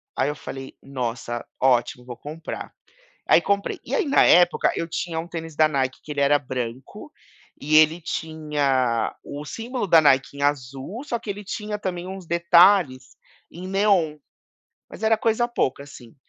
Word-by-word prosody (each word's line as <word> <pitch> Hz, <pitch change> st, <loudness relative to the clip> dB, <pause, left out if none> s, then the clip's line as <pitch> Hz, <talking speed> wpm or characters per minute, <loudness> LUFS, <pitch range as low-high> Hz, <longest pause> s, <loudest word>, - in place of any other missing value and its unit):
Aí 130 Hz, -, +1 dB
eu 150 Hz, -, -3 dB
falei: 135 Hz, -3 st, -9 dB
"Nossa, 120 Hz, -3 st, -4 dB, 0.2 s
ótimo, 125 Hz, -1 st, +2 dB
vou 120 Hz, -1 st, -8 dB
comprar", 155 Hz, +2 st, -8 dB, 0.6 s
aí -, -, +6 dB
comprei. 200 Hz, 0 st, -1 dB
E -, -, -4 dB
aí 425 Hz, -9 st, +1 dB
na 280 Hz, -, +4 dB
época 175 Hz, 0 st, +4 dB
eu 165 Hz, -, -3 dB
tinha 165 Hz, -1 st, -3 dB
um 170 Hz, -, -9 dB
tênis 165 Hz, -2 st, -7 dB
da 155 Hz, -1 st, +5 dB
Nike 130 Hz, -3 st, -2 dB
que 150 Hz, -, -7 dB
ele 140 Hz, -, -3 dB
era 145 Hz, +1 st, +4 dB
branco, 125 Hz, -2 st, -6 dB, 0.5 s
e 155 Hz, +2 st, +2 dB
ele 155 Hz, +2 st, +5 dB
tinha 145 Hz, -7 st, -1 dB
o 145 Hz, +1 st, -7 dB
símbolo 235 Hz, -, -4 dB
da 165 Hz, -3 st, +6 dB
Nike 140 Hz, -1 st, +2 dB
em 140 Hz, -, -5 dB
azul, 140 Hz, -, -2 dB
só 240 Hz, -5 st, -2 dB
que 225 Hz, -, -13 dB
ele 205 Hz, +1 st, -5 dB
tinha 210 Hz, +1 st, -4 dB
também 180 Hz, -3 st, -4 dB
uns 190 Hz, -2 st, -8 dB
detalhes 170 Hz, -5 st, +4 dB, 0.3 s
em 180 Hz, +2 st, -8 dB
neon 190 Hz, -6 st, +2 dB, 0.7 s
mas -, -, -11 dB
era 220 Hz, 0 st, +3 dB
coisa 230 Hz, +2 st, +1 dB
pouca 140 Hz, -, -1 dB
assim, 125 Hz, -5 st, -14 dB
155 Hz, 170 wpm, -23 LUFS, 135-190 Hz, 0.7 s, aí